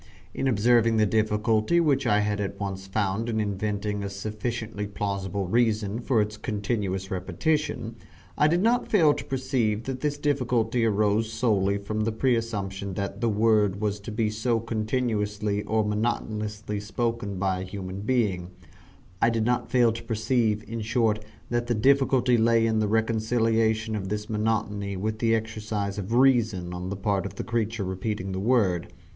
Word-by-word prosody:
In 135 - -1
observing 115 0 +3
the 110 - +4
difficulty 110 +7 +2
which 140 -5 +2
I 105 0 +4
had 105 0 -1
at 100 0 -4
once 95 -1 -4
found 100 +3 -1
in 110 -1 0
inventing 105 0 -2
a 100 - -3
sufficiently 110 +1 -4
plausible 100 -1 -3
reason 110 0 +1
for 120 -3 +2
its 105 +1 -6
continuous 100 -3 -2
repetition, 120 - -1 0.4
I 150 - +4
did 170 +4 +2
not 240 +2 +2
fail 160 -8 +5
to - - -5
perceive 125 -5 -1
that 130 0 -4
this 145 -1 -1
difficulty 125 -5 +1
arose 110 +1 +1
solely 100 -5 +1
from 100 +2 -4
the 110 +1 0
preassumption 105 -5 -1
that 100 +3 -4
the 115 - +2
word 105 -2 +2
was 105 -1 -1
to 100 +3 -7
be 110 0 0
so 115 +2 0
continuously 110 -2 -1
or 110 0 +1
monotonously 105 -1 -2
spoken 105 0 -2
by 95 -1 0
a - - -4
human 95 0 -6
being 105 -7 0 0.7
I 115 - +5
did 115 -1 0
not 125 +1 0
fail 120 -2 +4
to 115 +1 -6
perceive, 110 -1 0
in 115 0 -4
short, 110 -1 +1 0.3
that 120 0 0
the 120 - +1
difficulty 130 0 +3
lay 115 0 +4
in 110 -1 +1
the 105 - +1
reconciliation 110 0 +1
of 95 -2 -4
this 105 +2 -3
monotony 105 -2 -1
with 110 +3 -2
the 115 -1 +3
exercise 105 -2 -3
of 100 +2 -5
reason 115 -9 +3
on 90 +1 -5
the 100 - -4
part 100 -1 0
of - - -11
the - - -4
creature 115 -1 -1
repeating 95 +1 -3
the 95 - -3
word. 95 -6 +1
110 Hz, 165 wpm, -26 LUFS, 100-115 Hz, 0.7 s, fail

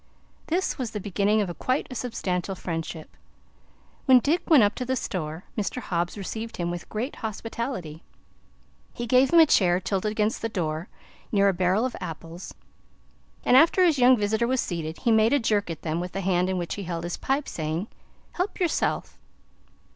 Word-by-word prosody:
This 350 -2 -1
was 250 -3 -2
the 210 - -5
beginning 205 +2 +1
of 175 -4 -4
quite 255 +2 0
a - - -4
substantial 195 -7 -2
friendship. 165 -2 -5 0.9
When 260 -2 +8
Dick 310 +8 0
went 295 -8 +7
up 205 0 +3
to - - +1
the 260 +1 -1
store, 165 -7 -4
Mr. 210 +4 -2
Hobbs 175 -4 -2
received 220 +3 -5
him 175 -1 -1
with 175 0 -6
great 235 +7 -4
hospitality. 220 - -5 0.9
He 240 - -4
gave 255 +4 +4
him 340 - +7
a 325 - +9
chair 180 - +3
tilted 195 +2 -1
against 215 0 0
the 225 - -1
door, 165 -4 -3 0.4
near 200 -1 +4
a - - +1
barrel 185 +5 +2
of 255 - -3
apples, 165 0 -7 0.9
and 250 - +5
after 325 +6 +6
his 315 -6 +3
young 250 +1 +6
visitor 220 +2 +1
was 260 +1 +1
seated, 165 -5 -3
he 235 - +1
made 220 +3 +4
a 285 - +4
jerk 210 -5 0
at 165 - -6
them 160 0 -1
with 180 +1 -5
the 195 - -2
hand 180 -1 +1
in 190 - -1
which 175 -1 -3
he 200 - -5
held 170 -1 -4
his 175 0 -3
pipe, 275 +2 -1
saying: 160 +5 -3 0.4
"Help 365 +4 -3
yerself." 350 -3 -1
205 Hz, 185 wpm, -26 LUFS, 175-245 Hz, 0.9 s, a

